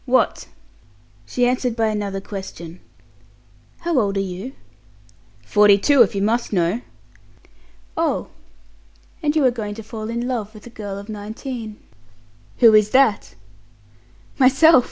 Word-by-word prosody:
"What?" - - +1 0.8
She 245 - +1
answered 250 -1 0
by 225 -1 +1
another 205 -2 -3
question. 185 -4 -8 1.0
"How 340 -5 +1
old 200 -3 0
are - - +1
you?" 195 +6 -5 0.9
"Forty 205 - +5
two, 280 +6 +4
if 210 -3 +4
you 195 - 0
must 230 +3 0
know." 180 +4 0 1.1
"Oh! - - -1 0.9
And 295 0 0
you 300 -4 +3
are 255 - +5
going 210 -3 -5
to 225 - -8
fall 215 +1 -7
in 235 +1 -3
love 225 -4 -4
with 215 - -13
a 240 - -11
girl 205 -3 -6
of 200 +1 -9
nineteen." 220 +1 -7 0.8
"Who 230 -3 +6
is 215 -1 +5
that?" 260 -4 +2 1.0
"Myself!" 270 +4 +6
220 Hz, 135 wpm, -21 LUFS, 205-245 Hz, 1.1 s, Who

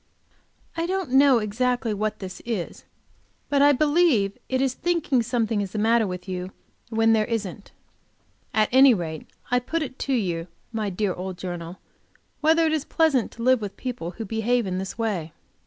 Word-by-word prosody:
I 330 +1 -1
don't 375 -6 -2
know 270 -1 +6
exactly 230 +2 0
what 215 +1 -2
this 185 -2 -8
is, 220 -8 -4 0.6
but 280 -1 +3
I 290 +1 +7
believe 290 - +3
it 260 - +1
is 265 -1 +1
thinking 330 -6 +1
something 230 -2 0
is 195 -2 -5
the - - -3
matter 225 +1 +3
with 180 0 -6
you 185 0 -4 0.4
when 225 0 +3
there 215 -1 +3
isn't. 210 -4 -4 0.8
At 215 -1 +3
any 260 -1 +7
rate 160 -4 -5 0.2
I 250 - +4
put 320 +6 -2
it 260 -2 -8
to 275 - -1
you, 175 -8 -1 0.3
my 215 -2 -1
dear 195 0 -1
old 185 0 -6
journal, 175 -1 -6 0.6
whether 325 +2 +4
it 315 - +1
is 310 -3 0
pleasant 305 -7 +1
to 230 - -7
live 255 -1 +4
with 200 -2 -6
people 245 -10 -4
who 225 - -4
behave 225 +3 0
in 185 -1 -2
this 190 +3 -5
way? 190 -9 -2
225 Hz, 180 wpm, -24 LUFS, 195-260 Hz, 0.8 s, I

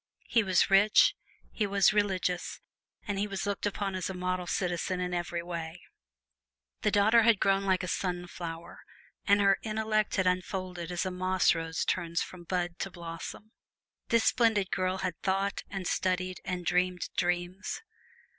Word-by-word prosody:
He 230 - +3
was 190 -1 +2
rich, 200 +2 +6 0.4
he 210 - -1
was 200 +1 +4
religious, 190 -4 0 0.5
and 200 -1 -2
he 205 - 0
was 195 -1 -4
looked 205 0 -1
upon 200 -1 -2
as 185 0 -2
a 190 - -5
model 180 0 -2
citizen 180 -1 -1
in 180 0 -2
every 175 -1 -2
way. 170 -1 -5 1.0
The 210 - +2
daughter 215 +3 +5
had 225 -2 +4
grown 195 0 +2
like 190 -1 +2
a - - -3
sunflower, 175 -2 -4 0.5
and 200 0 +5
her 195 -1 +4
intellect 215 -1 0
had 190 - +1
unfolded 180 -1 -2
as 175 +1 -1
a 185 - -2
moss 185 0 +2
rose 165 -1 -2
turns 170 -2 0
from 175 -2 -11
bud 175 -1 -2
to 195 - -2
blossom. 170 +4 -8 0.6
This 230 -1 +3
splendid 220 -5 +2
girl 185 +1 0
had 180 -2 -4
thought 195 +1 0
and 195 -2 -5
studied 185 0 -1
and 180 -1 -4
dreamed 180 0 +1
dreams. 180 - -2
185 Hz, 160 wpm, -30 LUFS, 175-200 Hz, 1.0 s, rich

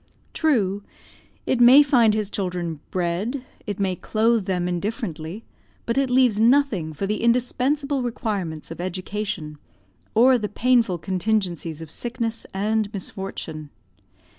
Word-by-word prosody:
True, 205 - +1 0.6
it 245 - +1
may 260 +5 +9
find 240 -6 +4
his 210 -2 -2
children 175 -5 -3
bread, 190 +9 -2 0.2
it 205 0 -4
may 190 -2 0
clothe 225 +1 +1
them 180 -2 -1
indifferently, 180 - -4 0.4
but 235 - -1
it 275 -1 +1
leaves 250 -4 +3
nothing 230 - +3
for 155 +6 -4
the 210 +2 -2
indispensable 260 +4 +1
requirements 200 -10 -3
of 165 - -6
education, 185 -4 -4 0.6
or 250 +3 +6
the 210 -2 -3
painful 235 -4 +2
contingencies 180 -3 -2
of 160 - -12
sickness 230 0 -4
and 210 +2 0
misfortune. 190 -6 -6
210 Hz, 125 wpm, -23 LUFS, 180-240 Hz, 0.6 s, may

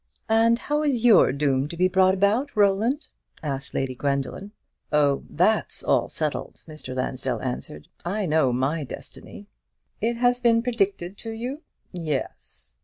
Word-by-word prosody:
"And 225 +1 +4
how 295 +4 -1
is 265 -6 0
your 220 - +7
doom 140 -1 +1
to 170 - -8
be 185 +1 +4
brought 185 0 +4
about, 215 +9 +1
Roland?" 215 +8 +2 0.4
asked 140 -2 -4
Lady 135 -1 -1
Gwendoline. 140 +8 -2 0.4
"Oh, 145 -2 +2
that's 210 +7 +1
all - - +2
settled," - - -4
Mr. 155 -5 -8
Lansdell 130 -1 -2
answered. 100 - -4 0.2
"I 195 +4 -1
know 155 -5 +3
my 135 +6 0
destiny." 200 +8 -10 0.6
"It 235 +2 +1
has 245 0 +3
been 230 -2 +3
predicted 200 -6 -1
to 225 - -5
you?" 245 +7 -5 0.3
"Yes." 150 - -4
185 Hz, 145 wpm, -25 LUFS, 140-230 Hz, 0.6 s, your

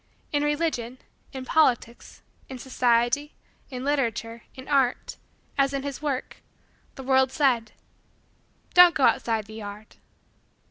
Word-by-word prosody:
In 290 - +1
religion, 295 -5 -1 0.3
in 260 -1 -7
politics, 250 -6 0 0.3
in 260 - -7
society, 250 +3 0 0.3
in 255 -2 -6
literature, 235 -5 -2
in 260 - -11
art 270 -4 0 0.4
as 275 0 +2
in 275 -1 -2
his 280 -1 -5
work 280 -4 -3 0.6
the 265 - -8
world 265 0 +3
said: 245 -7 +1 1.0
"Don't 355 -1 +8
go 275 - 0
outside 225 -4 +2
the 215 - -12
yard." 210 0 -9
260 Hz, 125 wpm, -25 LUFS, 235-285 Hz, 1.0 s, Don't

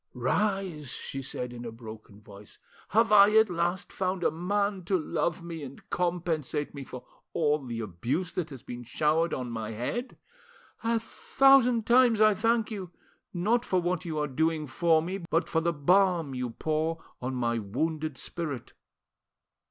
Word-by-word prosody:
"Rise," 180 - -1
she 135 +2 -5
said 125 -2 -5
in 120 0 -8
a 115 - -5
broken 110 -2 -11
voice. 100 0 -14 0.3
"Have 225 +2 +3
I 210 +1 +7
at 220 -3 +5
last 175 +2 -1
found 185 -1 -1
a - - +3
man 200 +3 -1
to 190 +2 +2
love 170 +1 -2
me 165 -2 -6
and 140 -1 -10
compensate 165 -4 -1
me 140 -1 -7
for 125 -1 -9 0.3
all 150 -1 +2
the 120 -3 -4
abuse 120 - -3
that 175 -3 -2
has 135 -4 -10
been 120 0 -7
showered 155 +7 +1
on 125 -2 -3
my 110 -1 -4
head? 180 - -4 0.7
A 230 0 +2
thousand 250 -1 +4
times 240 -2 +5
I 215 -1 +6
thank 225 +2 +1
you, 195 -4 -5 0.4
not 215 +7 +1
for 185 - +1
what 175 0 -1
you 165 -3 -4
are 150 0 0
doing 160 +3 0
for 160 +3 +2
me, 185 +4 -4
but 165 +2 +1
for 160 - +1
the 170 +1 +1
balm 170 -1 +2
you 125 -1 -3
pour 160 +6 -2 0.2
on 130 +1 -3
my 120 -2 0
wounded 155 +8 -2
spirit. 150 -8 -5
165 Hz, 165 wpm, -28 LUFS, 130-190 Hz, 0.7 s, I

